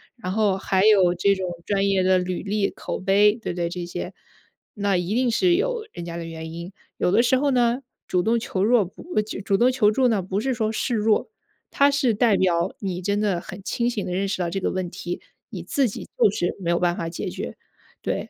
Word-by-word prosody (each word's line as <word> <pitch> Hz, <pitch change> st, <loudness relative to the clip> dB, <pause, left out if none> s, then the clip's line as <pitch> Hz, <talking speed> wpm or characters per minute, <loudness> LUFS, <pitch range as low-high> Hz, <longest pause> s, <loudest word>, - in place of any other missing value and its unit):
然 215 Hz, -7 st, -5 dB
后 205 Hz, -1 st, +2 dB
还 190 Hz, 0 st, +1 dB
有 190 Hz, -5 st, +5 dB
这 200 Hz, +3 st, +3 dB
种 190 Hz, -1 st, -3 dB, 0.2 s
专 200 Hz, -1 st, +1 dB
业 195 Hz, -1 st, +2 dB
的 185 Hz, 0 st, +4 dB
履 180 Hz, 0 st, -3 dB
历、 205 Hz, 0 st, 0 dB
口 -, -, -5 dB
碑， 200 Hz, +2 st, +4 dB
对 -, -, -3 dB
不 -, -, -7 dB
对， 175 Hz, -1 st, -1 dB
这 175 Hz, 0 st, -5 dB
些， -, -, -5 dB, 0.6 s
那 200 Hz, -2 st, +1 dB
一 180 Hz, +4 st, -1 dB
定 250 Hz, 0 st, +2 dB
是 350 Hz, +9 st, +3 dB
有 465 Hz, +3 st, -1 dB
人 170 Hz, -, -7 dB
家 170 Hz, 0 st, -6 dB
的 170 Hz, -, -5 dB
原 160 Hz, -1 st, -7 dB
因。 170 Hz, +2 st, -7 dB, 0.3 s
有 -, -, +1 dB
的 220 Hz, +5 st, +4 dB
时 255 Hz, -, +3 dB
候 285 Hz, +2 st, +1 dB
呢， 245 Hz, -1 st, +2 dB, 0.3 s
主 180 Hz, -, +1 dB
动 230 Hz, +5 st, +2 dB
求 190 Hz, -4 st, -2 dB
弱 225 Hz, -1 st, +4 dB
不 180 Hz, -, -12 dB, 0.2 s
主 210 Hz, -1 st, -6 dB
主 195 Hz, 0 st, +1 dB
动 245 Hz, +5 st, +4 dB
求 245 Hz, -5 st, +3 dB
助 255 Hz, +4 st, +3 dB
呢， 220 Hz, -5 st, +1 dB
不 190 Hz, +2 st, -2 dB
是 265 Hz, +4 st, 0 dB
说 220 Hz, -2 st, -1 dB
示 240 Hz, +3 st, -2 dB
弱， 220 Hz, -, +1 dB, 0.4 s
它 280 Hz, 0 st, +4 dB
是 280 Hz, -4 st, +2 dB
代 215 Hz, -1 st, +3 dB
表 175 Hz, 0 st, +1 dB
你 185 Hz, -3 st, -3 dB
真 200 Hz, +2 st, 0 dB
的 200 Hz, -5 st, 0 dB
很 185 Hz, -, -9 dB
清 235 Hz, +3 st, 0 dB
醒 225 Hz, -5 st, -3 dB
地 -, -, -4 dB
认 195 Hz, +2 st, 0 dB
识 195 Hz, -, -2 dB
到 175 Hz, -, 0 dB
这 195 Hz, -, -2 dB
个 -, -, -1 dB
问 185 Hz, -1 st, -2 dB
题， 175 Hz, 0 st, -5 dB, 0.3 s
你 -, -, -7 dB
自 280 Hz, -5 st, +1 dB
己 -, -, -7 dB
就 -, -, +5 dB
是 175 Hz, -3 st, -1 dB
没 175 Hz, -3 st, -3 dB
有 170 Hz, -, +2 dB
办 175 Hz, -1 st, +1 dB
法 165 Hz, -, -3 dB
解 165 Hz, -, -4 dB
决， -, -, -6 dB, 0.5 s
对。 -, -, -3 dB
200 Hz, 260 characters per minute, -24 LUFS, 180-230 Hz, 0.6 s, 有